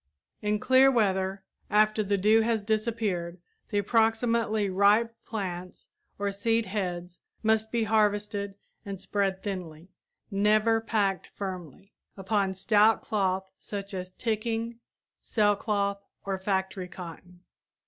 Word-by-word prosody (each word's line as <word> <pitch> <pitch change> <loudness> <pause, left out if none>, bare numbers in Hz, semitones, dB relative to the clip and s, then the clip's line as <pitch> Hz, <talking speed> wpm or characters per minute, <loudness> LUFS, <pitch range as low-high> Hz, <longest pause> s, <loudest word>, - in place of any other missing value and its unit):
In 210 0 +1
clear 260 +4 +5
weather 195 -5 +1 0.3
after 215 +1 +3
the 200 -1 +1
dew 215 +3 +5
has 225 -2 0
disappeared 210 -5 -1 0.3
the 205 - -1
approximately 225 0 +2
ripe 205 +4 +3
plants 185 -4 -5 0.3
or 200 0 -1
seed 225 +3 +1
heads 180 -3 -4 0.2
must 220 0 +2
be 235 -1 +1
harvested 205 -2 +1 0.3
and 200 -3 -6
spread 195 -1 -1
thinly 180 -4 -6 0.4
never 215 +3 +3
packed 205 -4 0
firmly 190 -1 -7 0.2
upon 195 0 0
stout 210 +3 +4
cloth 190 -2 0
such 200 -1 -6
as 185 -1 -4
ticking, 230 +1 -2 0.4
sailcloth, 205 -2 +1 0.2
or 195 -1 -2
factory 190 -1 -1
cotton. 180 0 -10
205 Hz, 115 wpm, -28 LUFS, 190-220 Hz, 0.4 s, clear